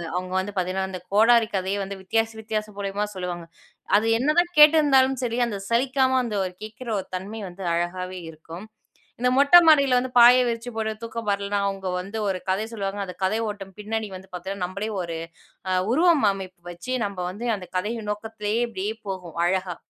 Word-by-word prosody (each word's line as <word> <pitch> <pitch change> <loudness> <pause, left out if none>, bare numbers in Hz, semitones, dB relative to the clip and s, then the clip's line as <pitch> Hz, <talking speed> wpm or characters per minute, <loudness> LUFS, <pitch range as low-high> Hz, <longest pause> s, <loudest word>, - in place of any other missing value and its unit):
அவங்க 185 0 -3
வந்து 200 +2 -4
பார்த்தீங்கன்னா, 185 +1 -1
அந்த 185 - -6
கோடாரி 225 +1 +5
கதைய 190 +2 -1
வந்து 195 0 -7
வித்தியாச, 225 +4 0
வித்தியாச 215 -1 -3
மூலியமா 200 +1 -2
சொல்லுவாங்க. 175 -2 -5 0.5
அது 220 - 0
என்னதான் 345 +6 +2
கேட்டிருந்தாலும் 285 -4 +6
சரி, 235 0 -2
அந்த 210 - -4
சலிக்காம 260 +2 +2
அந்த 230 -3 -3 0.3
கேக்குற 220 +3 -8
ஒரு 190 - -16
தன்மை 205 +4 -7
வந்து 185 +2 -10
அழகாவே 180 +2 -3
இருக்கும். 165 +4 -10 0.5
இந்த 250 +1 +2
மொட்டை 285 +6 +8
மாடியில 280 -5 +6
வந்து 255 +1 0
பாய 245 +1 +9
விரிச்சு 230 +1 -3
போட்டு 220 -1 -1
தூக்கம் 230 -1 -6
வரலன்னா, 200 0 0
அவங்க 195 -1 -4
வந்து 200 +4 -7
ஒரு 190 -1 -1
கதை 195 +3 0
சொல்லுவாங்க. 200 -2 -4
அந்த 180 -2 -8
கதை 190 +4 +1
ஓட்டம் 200 -2 -7
பின்னனி 220 +1 -3
வந்து 190 +1 -11
பாத்தீங்கன்னா, 185 +1 -4
நம்மளே 200 +4 -4
ஒரு 170 -1 -4 0.8
உருவமைப்பு 210 - +2
வச்சு, 175 +9 -7
நம்ம 200 -1 -6
வந்து 205 +6 -6
அந்த 190 -3 -8
கதையின் 210 +4 -2
நோக்கத்துலேயே 210 +1 -3
அப்படியே 210 -2 -3 0.2
போவோம், 180 -4 -6
அழகா. 185 0 0
210 Hz, 170 wpm, -24 LUFS, 190-235 Hz, 0.8 s, பாய